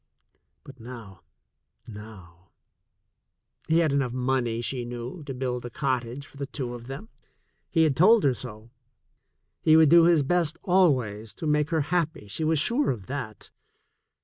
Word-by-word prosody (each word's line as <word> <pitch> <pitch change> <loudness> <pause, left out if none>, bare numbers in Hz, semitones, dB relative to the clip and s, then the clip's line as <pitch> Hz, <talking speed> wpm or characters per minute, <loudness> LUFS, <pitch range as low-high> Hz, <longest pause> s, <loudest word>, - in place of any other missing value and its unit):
But 135 -2 -14
now, 115 -6 -11 0.7
now! 95 -5 -13 1.1
He 160 - +3
had 160 -4 +2
enough 135 -4 0
money, 125 -2 -1
she 125 +1 -2
knew, 120 +7 -7
to 135 - -5
build 125 -1 -3
a 120 - -6
cottage 130 0 -3
for 140 - -17
the 140 -1 -4
two 130 -4 -5
of 120 0 -9
them. 140 +12 -8 0.6
He 165 -2 +3
had 150 -4 +2
told 215 - +5
her 135 - +3
so. 110 -1 -9 0.9
He 155 0 +5
would 160 -2 +6
do 170 +1 +7
his 170 -4 +4
best 170 +1 0
always 125 - +1
to - - -6
make 150 0 +1
her 160 -2 +1
happy, 160 -5 -2
she 105 +10 -4
was 160 0 +2
sure 240 - +2
of 110 -7 -3
that. 125 -7 -7
135 Hz, 160 wpm, -26 LUFS, 120-160 Hz, 1.1 s, do